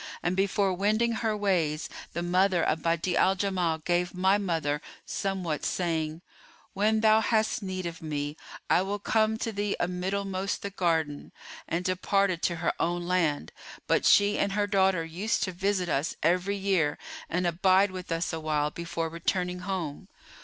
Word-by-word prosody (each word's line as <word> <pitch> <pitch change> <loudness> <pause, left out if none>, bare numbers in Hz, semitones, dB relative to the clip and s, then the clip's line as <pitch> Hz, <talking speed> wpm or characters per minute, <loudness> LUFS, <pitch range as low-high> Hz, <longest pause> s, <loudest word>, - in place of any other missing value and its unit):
And 175 +2 0
before 195 0 +1
wending 215 +5 +1
her 220 -1 -1
ways 170 -7 0 0.3
the 170 - -2
mother 180 0 +2
of 160 - +1
Badi'a 170 +2 0
al 190 +1 +4
Jamal 185 -4 0
gave 175 +3 -1
my 190 +2 +3
mother 160 -6 -1 0.2
somewhat,[FN#422] 185 -6 -2
saying, 160 -2 -1 0.5
'When 215 +2 +2
thou 220 0 +6
hast 220 0 +1
need 185 -2 -4
of 170 +1 -5
me, 150 -2 -3 0.3
I - - +4
will 200 +2 -2
come 220 +1 +1
to 225 0 -2
thee 205 -1 -1
a 175 - +1
middlemost 190 +2 -2
the 200 - -4
garden,' 160 -6 -1 0.4
and 175 +2 -2
departed 185 -1 +1
to 170 - +1
her 170 0 0
own 175 +1 0
land; 165 - 0 0.3
but - - +2
she 205 0 +5
and 200 - +1
her 205 0 +1
daughter 190 -4 +2
used 180 +7 -1
to 185 - -1
visit 190 0 0
us 150 0 -1
every 180 +5 +2
year 190 -7 +1 0.3
and 180 +2 0
abide 185 +3 +3
with 185 -2 -7
us 165 +1 -1
awhile 155 -2 0
before 170 0 -3
returning 180 +2 -2
home. 180 -2 -4
180 Hz, 165 wpm, -28 LUFS, 165-200 Hz, 0.5 s, thou